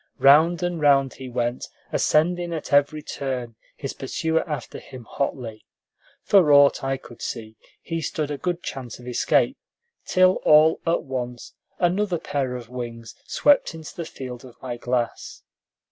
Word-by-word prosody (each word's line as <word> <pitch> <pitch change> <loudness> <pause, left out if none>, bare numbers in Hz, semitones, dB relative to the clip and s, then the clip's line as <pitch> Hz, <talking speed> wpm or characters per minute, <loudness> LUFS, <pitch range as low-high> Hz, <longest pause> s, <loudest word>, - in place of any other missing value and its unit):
Round 160 +5 +5
and 175 -2 -2
round 135 -2 +4
he 130 -1 -9
went, 120 0 -2 0.2
ascending 175 +2 +1
at 155 - -6
every 145 +2 +3
turn, 130 -5 -4 0.2
his 135 - -5
pursuer 160 +4 -1
after 150 - -5
him 130 -2 -11
hotly. 115 -3 -4 0.6
For 185 -7 +5
aught 140 -1 +6
I 135 0 -1
could 120 -3 -14
see, 110 -1 -5 0.3
he 165 -1 -3
stood 155 -1 -3
a 145 - -3
good 180 -1 -2
chance 125 -3 -6
of 125 - -13
escape, 125 - +1 0.5
till 185 0 +4
all 155 +1 +6
at 165 - +1
once 125 -2 -5 0.2
another 180 +1 +1
pair 135 -5 -2
of 120 -2 -7
wings 120 -2 -7
swept 290 - +3
into 160 -2 -10
the 170 - -5
field 125 -5 -8
of 125 -2 -14
my 125 -2 -5
glass. 120 -1 -3
140 Hz, 155 wpm, -24 LUFS, 125-160 Hz, 0.6 s, aught